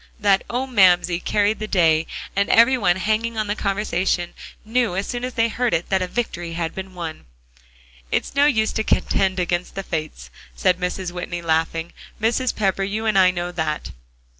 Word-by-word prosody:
That 200 -2 +3
"Oh, 250 +2 -1
Mamsie!" 180 -7 +4
carried 205 +3 +1
the 215 - -4
day, 165 -5 +3 0.3
and 200 0 +1
every 235 +3 +6
one 195 -8 +2
hanging 220 +4 -1
on 215 - 0
the 205 0 -2
conversation 195 -4 -1 0.3
knew 230 -3 0
as 195 +1 -1
soon 245 -1 -4
as 250 0 -4
they 230 0 +3
heard 240 +1 0
it 165 - -3
that 190 -1 +2
a 185 - -1
victory 175 -6 -3
had 165 -1 -3
been 190 -1 -7
won. 165 - -6 0.8
"It's - - -1
no 285 +1 +4
use 220 -6 +2
to 220 - -1
contend 190 -3 +1
against 175 0 -2
the 195 - -4
Fates," 155 - -5 0.2
said 180 -1 +2
Mrs. 180 0 -3
Whitney, 175 -1 -5
laughing, 165 +1 0 0.3
"Mrs. 235 +3 0
Pepper, 195 -2 0
you 205 +3 -2
and 215 -2 +1
I 185 -1 +6
know 175 -1 -3
that." 160 -3 -3
190 Hz, 190 wpm, -22 LUFS, 175-220 Hz, 0.8 s, every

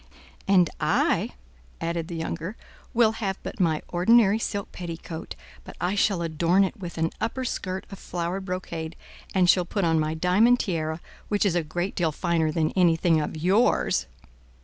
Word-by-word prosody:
"And 185 -3 +5
I," - - +1 0.5
added 165 -1 -2
the 175 - -6
younger, 165 +4 -4 0.3
"will 230 -2 +4
have 200 -4 -3
but - - -7
my 160 -4 +1
ordinary 210 +4 +4
silk 205 -3 -3
petticoat, 170 -2 -7 0.3
but - - -11
I 180 +2 0
shall 200 -3 +1
adorn 170 +4 +2
it 190 - -1
with 180 -6 -8
an 165 0 0
upper 255 +4 -2
skirt 185 -5 -3
of 195 - -8
flowered 180 +2 -3
brocade, 170 -3 -4 0.4
and 185 -2 +4
shall 180 0 +5
put 195 +2 -1
on 165 -1 +3
my 155 +1 -1
diamond 200 +9 +4
tiara, 160 -3 -2 0.3
which 205 0 +1
is 195 - +2
a 175 - +2
great 175 +5 -3
deal 170 -4 0
finer 165 0 0
than 155 0 0
anything 165 -3 +3
of 150 - -4
yours." 175 - +2
175 Hz, 170 wpm, -26 LUFS, 165-195 Hz, 0.5 s, And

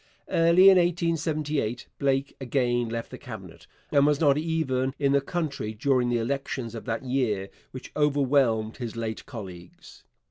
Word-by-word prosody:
Early 170 +2 +5
in 185 - +6
1878 155 -7 -1
Blake 135 0 0
again 120 -2 0
left 115 0 -5
the - - -8
Cabinet, - - -10 0.2
and 140 - +4
he - - +4
was 150 -1 +2
not 145 -4 +4
even 140 -5 -1
in 140 -1 +1
the 140 0 +3
country 140 -8 -3
during 125 +1 +1
the 120 - +1
elections 120 -1 -3
of 115 - -7
that 115 +1 -3
year 115 -7 -1 0.2
which 130 - -10
overwhelmed 135 -6 +2
his 120 -3 -5
late 115 -1 -4
colleagues. 95 -8 -10
135 Hz, 155 wpm, -26 LUFS, 115-150 Hz, 0.2 s, in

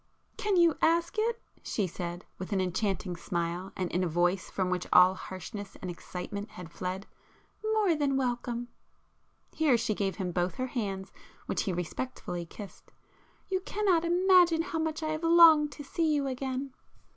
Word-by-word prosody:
"Can 410 -3 0
you 340 -3 +4
ask 340 +5 +2
it!" 460 +1 0 0.2
she 205 - -1
said, 175 0 -5
with 185 +3 -6
an 200 - +1
enchanting 185 0 -1
smile, 170 +2 -3
and 185 -2 -2
in 180 +2 +1
a - - +1
voice 175 +3 +1
from 185 -1 -1
which 180 -1 -1
all 180 +1 +7
harshness 190 +2 -8
and 185 - -4
excitement 195 +4 -6
had 180 -4 -10
fled; 185 +3 -4 0.7
"More 410 -5 +3
than 285 -3 +1
welcome!" 245 -2 -2 0.8
Here 300 -6 +3
she 220 - 0
gave 195 -2 -1
him 185 -3 -3
both 175 +1 -1
her 255 - -2
hands 195 -6 -4 0.3
which - - -1
he 195 - 0
respectfully 175 0 -4
kissed. 200 +3 -11 0.6
"You 380 -1 0
cannot 375 -3 +1
imagine 350 -1 +5
how 330 -1 -3
much 320 0 -2
I 310 - -1
have 310 0 -2
longed 330 -3 +7
to 290 - -8
see 315 +3 0
you 285 -1 0
again!" 265 0 -3
235 Hz, 170 wpm, -30 LUFS, -, 0.8 s, all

